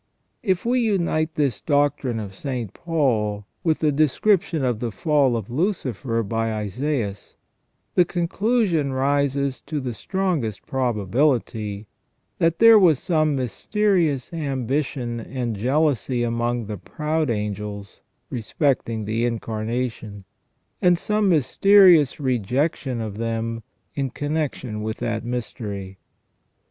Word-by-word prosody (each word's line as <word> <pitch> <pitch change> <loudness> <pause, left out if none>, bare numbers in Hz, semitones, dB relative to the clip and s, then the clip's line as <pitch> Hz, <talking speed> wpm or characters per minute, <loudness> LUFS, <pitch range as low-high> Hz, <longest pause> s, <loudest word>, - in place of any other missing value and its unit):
If 190 -3 0
we 250 +2 +2
unite 170 -8 0
this 140 -7 0
doctrine 145 -5 +1
of 100 -3 -6
St. 120 -2 -4
Paul 110 -11 0 0.2
with 160 -2 +2
the 155 -1 +2
description 155 +2 +2
of 120 -4 0
the 120 - -2
fall 140 -2 +2
of 110 0 -6
Lucifer 130 - -1
by 115 +2 -1
Isaias, 105 0 -3 0.6
the 180 - +5
conclusion 175 - 0
rises 140 0 0
to 155 - -4
the 125 -3 -4
strongest 160 - -2
probability 115 -3 0 0.5
that 165 0 +2
there 230 -1 +8
was 170 -7 +5
some 155 -1 +1
mysterious 160 - 0
ambition 135 -4 -2
and 120 -1 -4
jealousy 130 +1 +1
among 120 0 -1
the 105 0 -5
proud 155 - -2
angels 105 -2 -4 0.3
respecting 115 -2 -1
the 110 +2 -1
Incarnation, 115 -2 -3 0.6
and 180 -1 +4
some 210 +2 +1
mysterious 175 -1 +5
rejection 130 +1 -1
of 110 -1 -5
them 115 0 -2 0.3
in 135 -2 -2
connection 145 -6 -3
with 110 +1 -3
that 115 -2 -2
mystery. 105 -5 -5
130 Hz, 115 wpm, -23 LUFS, 115-155 Hz, 0.6 s, there